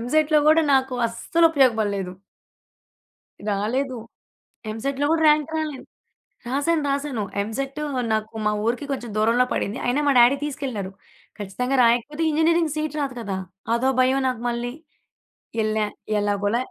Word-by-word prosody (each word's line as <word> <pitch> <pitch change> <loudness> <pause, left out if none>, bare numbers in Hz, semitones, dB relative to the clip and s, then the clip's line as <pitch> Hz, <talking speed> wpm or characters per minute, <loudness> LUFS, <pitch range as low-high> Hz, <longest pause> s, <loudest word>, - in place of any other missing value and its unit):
ఎంసెట్‌లో 305 +5 +2
గూడా 320 +1 +5
నాకు 265 -1 +1
అస్సలు 330 +8 +2
ఉపయోగపడలేదు. 215 - +2 1.4
రాలేదు. 245 +6 -1 0.8
ఎంసెట్‌లో 275 +5 -2
కూడా 320 -1 +2
ర్యాంక్ 300 +1 +3
రాలే. 305 -3 -3 0.7
రాశాను, 290 +4 0
రాశాను. 275 -6 -2 0.2
ఎంసేట్ 270 +7 -4 0.3
నాకు 220 +1 -2
మా 210 - +3
ఊరికి 245 +5 -1
కొంచెం 240 -5 -4
దూరంలో 230 +4 +3
పడింది. 210 +6 -2
అయినా 255 +4 +1
మా - - +5
డాడీ 245 +4 +6
తీసుకెళ్లారు. 255 -10 -4 0.5
ఖచ్చితంగా 250 +7 -2
రాయకపోతే 245 +7 +1
ఇంజినీరింగ్ 320 0 +2
సీట్ 305 -1 -3
రాదు 270 -3 -3
కదా! 195 -3 -3 0.4
అదో 260 +3 +1
భయం 260 +1 +3
నాకు 250 -3 -2
మళ్లీ. 240 +1 -3 0.9
ఎల్లా, 215 0 0 0.3
ఎలాగోల 205 +1 0
255 Hz, 125 wpm, -23 LUFS, 220-295 Hz, 1.4 s, డాడీ